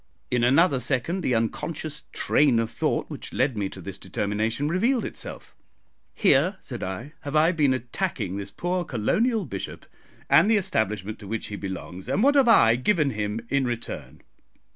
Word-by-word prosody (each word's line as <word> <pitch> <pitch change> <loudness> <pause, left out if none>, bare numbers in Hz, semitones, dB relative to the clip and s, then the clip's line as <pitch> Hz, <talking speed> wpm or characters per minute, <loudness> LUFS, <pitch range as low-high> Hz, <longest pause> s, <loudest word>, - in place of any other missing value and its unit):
In 125 -1 +2
another 140 +3 +4
second 135 +9 -1
the 130 -7 +1
unconscious 150 +6 -3
train 140 -5 +3
of 115 -1 0
thought - - -1
which - - -7
led 135 - +1
me 100 -2 -2
to 95 - -10
this 95 +2 -7
determination 110 +9 -1
revealed 230 - +1
itself. - - -8 0.6
"Here," 185 0 +3
said 120 -5 -7
I, 95 - -5
"have 145 +1 -5
I 155 +3 +5
been 150 -6 +2
attacking 130 - -2
this 100 0 -5
poor 175 - -2
colonial 210 - 0
bishop - - -6 0.4
and 210 - +5
the 225 - +5
Establishment 110 - -1
to 100 - -10
which 110 +1 -4
he 105 - -5
belongs, 95 -1 -6
and 205 - +1
what 285 +2 +5
have 275 -3 +4
I 120 - +6
given 150 +1 +2
him 105 0 -3
in 140 -1 +1
return? 120 -1 -5
130 Hz, 170 wpm, -25 LUFS, 110-170 Hz, 0.6 s, I